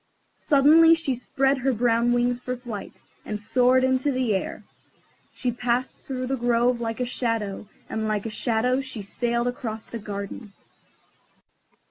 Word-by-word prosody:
Suddenly 315 Hz, +3 st, +6 dB
she 320 Hz, -5 st, -1 dB
spread 270 Hz, +2 st, 0 dB
her 260 Hz, +1 st, +1 dB
brown 235 Hz, +1 st, +2 dB
wings 245 Hz, 0 st, +1 dB
for 250 Hz, 0 st, -3 dB
flight, 240 Hz, -5 st, -8 dB, 0.2 s
and 210 Hz, -1 st, -4 dB
soared 250 Hz, +4 st, +3 dB
into 260 Hz, +2 st, +2 dB
the 255 Hz, -4 st, 0 dB
air. 190 Hz, -, -3 dB, 0.7 s
She 250 Hz, -, -1 dB
passed 245 Hz, +1 st, -1 dB
through 255 Hz, -1 st, -4 dB
the 265 Hz, +1 st, -1 dB
grove 240 Hz, 0 st, +2 dB
like 225 Hz, 0 st, -3 dB
a 250 Hz, -, 0 dB
shadow, 225 Hz, -5 st, -2 dB, 0.2 s
and 220 Hz, 0 st, -2 dB
like 210 Hz, -1 st, -1 dB
a 225 Hz, -, -3 dB
shadow 245 Hz, +4 st, +1 dB
she 260 Hz, -6 st, -7 dB
sailed 235 Hz, +4 st, -1 dB
across 225 Hz, -3 st, -4 dB
the 230 Hz, -, -7 dB
garden. 200 Hz, +1 st, -7 dB
245 Hz, 150 wpm, -25 LUFS, 225-255 Hz, 0.7 s, Suddenly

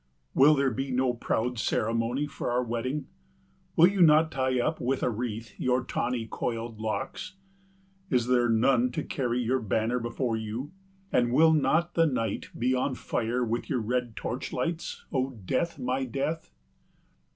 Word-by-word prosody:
Will 145 Hz, +3 st, +6 dB
there 135 Hz, -2 st, +2 dB
be 135 Hz, +4 st, -3 dB
no 130 Hz, -1 st, +1 dB
proud 120 Hz, 0 st, -1 dB
ceremony 115 Hz, +6 st, 0 dB
for 145 Hz, -, -4 dB
our 125 Hz, +1 st, +1 dB
wedding? 125 Hz, +5 st, -2 dB, 0.7 s
Will 165 Hz, -, +8 dB
you 190 Hz, 0 st, 0 dB
not 160 Hz, -1 st, +6 dB
tie 130 Hz, -1 st, 0 dB
up 155 Hz, +6 st, 0 dB
with 130 Hz, +2 st, 0 dB
a 125 Hz, -, +2 dB
wreath 115 Hz, 0 st, -4 dB
your 125 Hz, 0 st, +1 dB
tawny 125 Hz, -2 st, -2 dB
coiled 115 Hz, 0 st, -4 dB
locks? 120 Hz, -, -4 dB, 0.7 s
Is 125 Hz, -2 st, +2 dB
there 120 Hz, -1 st, +3 dB
none 120 Hz, +2 st, +3 dB
to -, -, -2 dB
carry 125 Hz, -2 st, -1 dB
your 130 Hz, +3 st, +1 dB
banner 110 Hz, +2 st, 0 dB
before 120 Hz, 0 st, -2 dB
you, 110 Hz, +7 st, -5 dB, 0.4 s
and 120 Hz, -1 st, +2 dB
will 160 Hz, +5 st, +6 dB
not 160 Hz, +3 st, +2 dB
the 165 Hz, -1 st, +4 dB
night 120 Hz, -6 st, -2 dB
be 125 Hz, +2 st, +1 dB
on 130 Hz, +1 st, 0 dB
fire 120 Hz, +1 st, -1 dB
with 115 Hz, +1 st, -2 dB
your 135 Hz, -5 st, +1 dB
red 120 Hz, +1 st, -2 dB
torch 125 Hz, +3 st, -4 dB
lights, 170 Hz, 0 st, -3 dB
O 130 Hz, -3 st, -1 dB
Death, 170 Hz, -, 0 dB
my 130 Hz, +2 st, -1 dB
Death? 140 Hz, +6 st, -3 dB
125 Hz, 160 wpm, -28 LUFS, 115-135 Hz, 0.7 s, Will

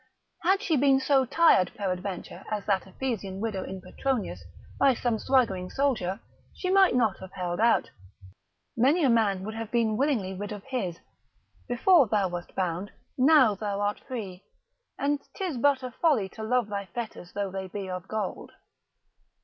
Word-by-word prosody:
Had 385 Hz, +4 st, +2 dB
she 325 Hz, -, +1 dB
been 270 Hz, 0 st, +4 dB
so 270 Hz, 0 st, +3 dB
tired 245 Hz, -, +4 dB
peradventure 185 Hz, -1 st, -4 dB
as 210 Hz, -2 st, -3 dB
that 195 Hz, -2 st, 0 dB
Ephesian 195 Hz, -3 st, -4 dB
widow 205 Hz, -3 st, -2 dB
in 190 Hz, 0 st, -7 dB
Petronius, 195 Hz, -, -3 dB, 0.4 s
by 270 Hz, -2 st, +5 dB
some 235 Hz, -2 st, -1 dB
swaggering 210 Hz, -10 st, +1 dB
soldier, 235 Hz, -9 st, 0 dB, 0.4 s
she 365 Hz, -, -2 dB
might 385 Hz, -6 st, +5 dB
not 225 Hz, -6 st, +2 dB
have 190 Hz, 0 st, -10 dB
held 180 Hz, -1 st, -3 dB
out. 230 Hz, +1 st, +3 dB, 0.8 s
Many 280 Hz, +9 st, +3 dB
a 265 Hz, -, +4 dB
man 205 Hz, -5 st, +2 dB
would 215 Hz, +2 st, -5 dB
have 225 Hz, -1 st, -5 dB
been 225 Hz, -2 st, +1 dB
willingly 240 Hz, -9 st, 0 dB
rid 205 Hz, +2 st, -6 dB
of 205 Hz, -2 st, -7 dB
his: 215 Hz, -11 st, -3 dB, 0.7 s
before 275 Hz, +4 st, +5 dB
thou 200 Hz, -3 st, +1 dB
wast 175 Hz, 0 st, -7 dB
bound, 185 Hz, +1 st, -2 dB, 0.2 s
now 265 Hz, -4 st, +5 dB
thou 200 Hz, 0 st, -3 dB
art 205 Hz, 0 st, -1 dB
free; 200 Hz, -8 st, -7 dB, 0.5 s
and 285 Hz, 0 st, 0 dB
'tis 365 Hz, -9 st, -3 dB
but 270 Hz, +1 st, +2 dB
a 255 Hz, -, -5 dB
folly 260 Hz, -, +2 dB
to 220 Hz, -, -10 dB
love 240 Hz, +1 st, +1 dB
thy 200 Hz, -2 st, -4 dB
fetters 180 Hz, -2 st, -7 dB
though 200 Hz, -1 st, -2 dB
they 190 Hz, 0 st, -5 dB
be 195 Hz, +1 st, -6 dB
of 185 Hz, 0 st, -5 dB
gold. 215 Hz, -3 st, -4 dB
215 Hz, 165 wpm, -27 LUFS, 190-265 Hz, 0.8 s, by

